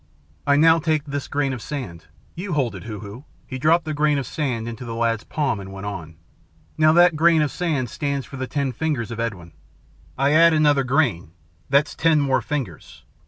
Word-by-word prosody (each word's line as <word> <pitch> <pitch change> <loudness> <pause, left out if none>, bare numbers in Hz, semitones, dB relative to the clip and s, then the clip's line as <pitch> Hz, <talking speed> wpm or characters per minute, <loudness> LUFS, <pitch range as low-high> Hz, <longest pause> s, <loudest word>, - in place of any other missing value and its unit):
I 140 - +5
now 160 +2 +5
take 155 -2 0
this 140 -1 -4
grain 140 -2 -1
of 125 - -6
sand 105 - -7 0.3
you 180 +1 -5
hold 135 -6 0
it, - - -9
Hoo 105 -4 -6
Hoo." 105 +7 -10 0.2
He 130 - -6
dropped 160 +4 +3
the 155 - -3
grain 150 0 +2
of 135 - -2
sand 125 -7 -3
into 115 +2 -6
the 115 -2 -6
lad's 115 -2 0
palm 140 -8 -1
and 95 0 -9
went 95 +1 -8
on. 85 -6 -6 0.6
"Now 155 0 +4
that 175 0 +5
grain 165 0 +4
of 150 - -1
sand 155 -8 -1
stands 140 +2 -3
for 140 0 -10
the 130 0 -4
ten 140 -1 -1
fingers 135 -6 -2
of 115 - -6
Edwin. 95 -8 -4 0.7
I 135 +2 +2
add 165 +2 +6
another 145 -3 +3
grain. 125 - 0 0.4
That's 140 +2 +3
ten 160 -1 +3
more 135 -2 +1
fingers. 150 -4 -6
140 Hz, 205 wpm, -22 LUFS, 115-155 Hz, 0.7 s, add